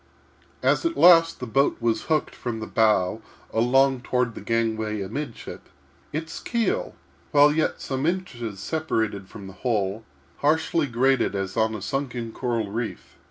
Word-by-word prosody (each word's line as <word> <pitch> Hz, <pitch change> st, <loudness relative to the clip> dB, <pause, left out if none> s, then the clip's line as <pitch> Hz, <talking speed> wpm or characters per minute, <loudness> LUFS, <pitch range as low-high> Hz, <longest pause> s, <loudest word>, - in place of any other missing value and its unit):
As, -, -, +3 dB
at 335 Hz, 0 st, -1 dB
last, 165 Hz, -2 st, +6 dB
the 125 Hz, -, -4 dB
boat 135 Hz, +4 st, +2 dB
was 115 Hz, -2 st, 0 dB
hooked 155 Hz, -2 st, 0 dB
from 120 Hz, -2 st, -4 dB
the 110 Hz, -, -4 dB
bow 110 Hz, -2 st, +2 dB, 0.3 s
along 130 Hz, +3 st, +3 dB
toward 125 Hz, -1 st, 0 dB
the -, -, -8 dB
gangway 110 Hz, -2 st, -1 dB
amidship, 120 Hz, +6 st, -6 dB, 0.4 s
its 160 Hz, +2 st, -4 dB
keel, 340 Hz, -, -1 dB, 0.3 s
while 145 Hz, 0 st, +6 dB
yet 155 Hz, 0 st, 0 dB
some 135 Hz, +2 st, -2 dB
inches 120 Hz, -, -3 dB
separated 110 Hz, -8 st, -2 dB
from 100 Hz, -3 st, -10 dB
the 95 Hz, -, -9 dB
hull, 105 Hz, -3 st, -1 dB, 0.3 s
harshly 160 Hz, +1 st, +1 dB
grated 130 Hz, -2 st, +2 dB
as 95 Hz, -1 st, -3 dB
on 110 Hz, 0 st, +1 dB
a 100 Hz, -, -6 dB
sunken 125 Hz, -4 st, -3 dB
coral 115 Hz, -4 st, -2 dB
reef. 115 Hz, +1 st, -5 dB
120 Hz, 150 wpm, -25 LUFS, 110-145 Hz, 0.4 s, last